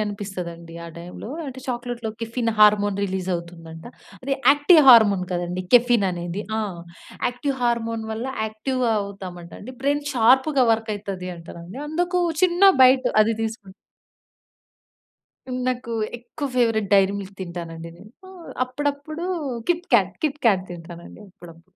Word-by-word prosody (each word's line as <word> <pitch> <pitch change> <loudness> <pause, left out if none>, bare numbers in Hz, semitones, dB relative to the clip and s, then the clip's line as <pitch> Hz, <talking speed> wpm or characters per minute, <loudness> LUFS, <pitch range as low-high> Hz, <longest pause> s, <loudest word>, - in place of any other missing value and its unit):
అనిపిస్తదండి 180 -5 -6
ఆ - - -8
టైమ్‌లో. 180 +5 -9 0.2
అంటే 260 -1 -8
చాక్లేట్‌లో 240 -2 -4
కెఫెన్ 230 +1 -2
హార్మోన్ 205 -1 +5
రిలీజ్ 190 -1 -3
అవుతుందంట. 165 -1 -8 0.4
అది 275 +1 -2 0.2
యాక్టివ్ 290 +3 +6
హార్మోన్ 210 -6 +7
గదండీ 175 +1 -3
కెఫెన్ 240 -4 +5
అనేది. 175 +3 -4 0.2
ఆ! - - +1 0.7
యాక్టివ్ 265 +2 -3
హార్మోన్ 230 -2 -1
వల్ల 230 +4 -4 0.2
యాక్టివ్‌గా 235 +2 -1
అవుతామంట 185 -4 -9
అండి. 255 +5 -9
బ్రెయిన్ 290 +1 0
షార్ప్‌గా 260 +3 +4
వర్క్ 225 0 -2
అయితది 195 -3 -6
అంట 165 0 -14
అండి. 185 +10 -10
అందుకు 355 +3 0 0.2
చిన్న 360 +1 +2 0.2
బైట్ 255 0 +5
అది 225 +1 0
తీసుకు 220 -3 -5 2.0
నాకు 245 -2 -3 0.3
ఎక్కువ 285 +5 -6
ఫేవరెట్ 225 -4 +2
'డైరీ 195 0 +4
మిల్క్' 195 0 -11
తింటానండి 165 -2 -7
నేను. 195 +5 -15 0.5
అప్పుడప్పుడు 290 +5 -4 0.5
'కిట్‌కాట్' 240 - +2
'కిట్‌కాట్' 235 -11 +1
తింటానండి 170 +3 -10
అప్పుడప్పుడు. 170 -2 -15
220 Hz, 125 wpm, -23 LUFS, 185-255 Hz, 2.0 s, హార్మోన్